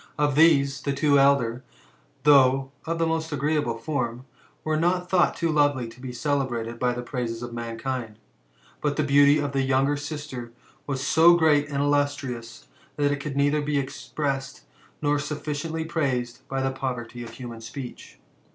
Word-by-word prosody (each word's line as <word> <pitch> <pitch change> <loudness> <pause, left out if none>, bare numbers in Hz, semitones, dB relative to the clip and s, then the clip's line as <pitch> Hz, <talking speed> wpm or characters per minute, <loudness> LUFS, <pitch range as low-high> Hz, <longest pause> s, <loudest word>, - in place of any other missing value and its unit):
Of 145 -1 +2
these, 140 -3 +4
the 140 - -1
two 140 +1 +3
eldei; 135 -4 +3 0.6
though 135 -2 +5 0.2
of 165 0 -1
the 165 - +1
most 160 0 -1
agreeable 145 -4 0
form, 125 -2 -3 0.4
were 155 0 0
not 180 +3 0
thought 180 -2 +3
too 165 -1 0
lovely 145 -5 +2
to 125 - -15
be 130 -1 -6
celebrated 120 -3 -2
by 125 -1 +1
the 120 0 -5
praises 120 -2 -4
of 120 -1 -6
mankind; 115 -1 -4 0.6
but 145 -1 0
the 155 - +1
beauty 145 +1 +5
of 145 -1 -1
the 135 -1 0
younger 135 +2 +2
sister 145 -5 -6 0.3
was 135 -1 -2
so 165 +3 +6
great 150 -3 +3
and 140 -1 -1
illustrious, 140 - -1 0.3
that 145 -1 +1
it 145 - -1
coiild 140 -1 -5
neither 145 +2 +2
be 145 0 -1
expressed, 135 0 -3 0.4
nor 145 0 +2
sufficiently 150 +2 -4
praised 130 -6 -2
by 135 -1 -2
the 135 - 0
poverty 125 -3 -5
of 115 - -8
human 120 -3 -8
q>eech. 125 +3 -9
140 Hz, 165 wpm, -25 LUFS, 125-150 Hz, 0.6 s, so